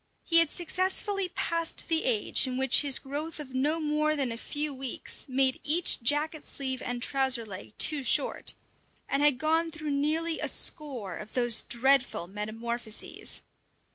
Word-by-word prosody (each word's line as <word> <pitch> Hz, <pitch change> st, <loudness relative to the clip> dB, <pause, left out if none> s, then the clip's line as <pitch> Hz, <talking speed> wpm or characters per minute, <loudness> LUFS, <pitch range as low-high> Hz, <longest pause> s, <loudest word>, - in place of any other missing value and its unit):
He 335 Hz, -1 st, +5 dB
had 330 Hz, -2 st, +4 dB
successfully 375 Hz, +2 st, -1 dB
passed 335 Hz, -1 st, 0 dB
the 325 Hz, -1 st, +1 dB
age 235 Hz, +2 st, +2 dB
in 255 Hz, 0 st, -3 dB
which 265 Hz, -1 st, +5 dB
his 280 Hz, -3 st, +1 dB
growth 295 Hz, +4 st, -5 dB
of 270 Hz, -3 st, -9 dB
no 295 Hz, +5 st, 0 dB
more 305 Hz, 0 st, 0 dB
than 270 Hz, -5 st, -1 dB
a -, -, -4 dB
few 295 Hz, +5 st, -3 dB
weeks 265 Hz, -2 st, -4 dB
made 260 Hz, 0 st, +2 dB
each 325 Hz, -1 st, +4 dB
jacket 295 Hz, +5 st, 0 dB
sleeve 260 Hz, -2 st, -3 dB
and 245 Hz, -1 st, -3 dB
trouser 265 Hz, -4 st, +2 dB
leg 200 Hz, 0 st, -9 dB
too 300 Hz, -3 st, +2 dB
short, 260 Hz, -, 0 dB, 0.5 s
and 275 Hz, -, 0 dB
had 290 Hz, -3 st, +5 dB
gone 320 Hz, +3 st, +1 dB
through 310 Hz, -2 st, -5 dB
nearly 315 Hz, +4 st, 0 dB
a -, -, -1 dB
score 260 Hz, -, -2 dB
of 215 Hz, -, -10 dB
those 240 Hz, -3 st, +4 dB
dreadful 265 Hz, -5 st, +2 dB
"metamorphoses." 220 Hz, +3 st, -5 dB
280 Hz, 160 wpm, -28 LUFS, 245-310 Hz, 0.5 s, He